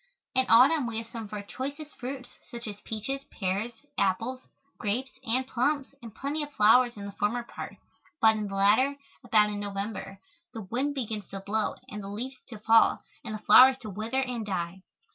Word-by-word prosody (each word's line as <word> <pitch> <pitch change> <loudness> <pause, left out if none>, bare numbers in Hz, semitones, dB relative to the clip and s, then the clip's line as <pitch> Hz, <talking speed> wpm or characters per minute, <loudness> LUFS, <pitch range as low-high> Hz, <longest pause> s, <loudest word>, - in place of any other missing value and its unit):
In 260 0 +3
autumn 255 +4 +6
we 230 -1 -4
have 225 0 -6
some 230 -2 -5
of 205 - -12
our 205 -1 -4
choicest 285 +8 -6
fruits, 255 0 -7
such 235 -1 -7
as 205 -1 -7
peaches, 250 +6 -4
pears, 220 +6 -3
apples, 225 +7 0 0.4
grapes 240 +6 -1
and 255 +3 0
plums 275 +2 0
and 225 -3 -10
plenty 290 +3 -2
of 295 0 -5
flowers 240 +3 +5
in 200 - -6
the 200 - -6
former 210 +4 -1
part, - - -8 0.4
but 220 -1 +6
in 210 -1 -2
the 195 - -5
latter, 220 +8 +4 0.3
about 215 -3 +4
in 205 - -4
November, 200 0 -5 0.4
the 225 - -4
wind 255 +9 -2
begins 220 -6 -4
to 195 - -7
blow 210 +2 -1
and 210 0 -7
the - - -6
leaves 240 +7 -6
to 225 - -8
fall 225 +2 +4 0.2
and 215 - -5
the 215 - -9
flowers 260 0 +8
to 215 -3 -7
wither 225 +7 -1
and 240 -4 -4
die. 180 -1 -3
225 Hz, 195 wpm, -28 LUFS, 205-260 Hz, 0.4 s, flowers